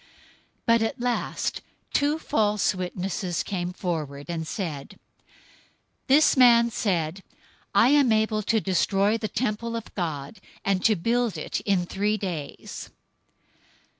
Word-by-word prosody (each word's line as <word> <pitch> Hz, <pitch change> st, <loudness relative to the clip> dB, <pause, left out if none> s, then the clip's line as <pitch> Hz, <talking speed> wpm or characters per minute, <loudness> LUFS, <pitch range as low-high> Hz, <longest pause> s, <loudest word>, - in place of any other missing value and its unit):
But 230 Hz, -1 st, +4 dB
at 225 Hz, +1 st, -1 dB
last 245 Hz, 0 st, -2 dB, 0.3 s
two 295 Hz, +2 st, +2 dB
false 210 Hz, -, +1 dB
witnesses 185 Hz, -1 st, -3 dB
came 180 Hz, -2 st, -3 dB
forward, 155 Hz, -6 st, -4 dB
026:061 -, -, -2 dB
and 160 Hz, -1 st, -4 dB
said, 155 Hz, -7 st, -5 dB, 1.1 s
"This 290 Hz, +4 st, +5 dB
man 235 Hz, -2 st, +6 dB
said, 180 Hz, -4 st, -1 dB, 0.5 s
'I 225 Hz, +5 st, +6 dB
am 280 Hz, -4 st, +4 dB
able 215 Hz, 0 st, +2 dB
to 220 Hz, +2 st, +1 dB
destroy 195 Hz, +3 st, +1 dB
the 215 Hz, -, -2 dB
temple 230 Hz, 0 st, -2 dB
of 230 Hz, -, -6 dB
God, 160 Hz, 0 st, -4 dB, 0.3 s
and 195 Hz, -2 st, +1 dB
to 220 Hz, -, +5 dB
build 230 Hz, +4 st, 0 dB
it -, -, -3 dB
in 190 Hz, -3 st, +2 dB
three 205 Hz, +4 st, 0 dB
days.'" 175 Hz, -8 st, -6 dB
205 Hz, 130 wpm, -25 LUFS, 175-230 Hz, 1.1 s, man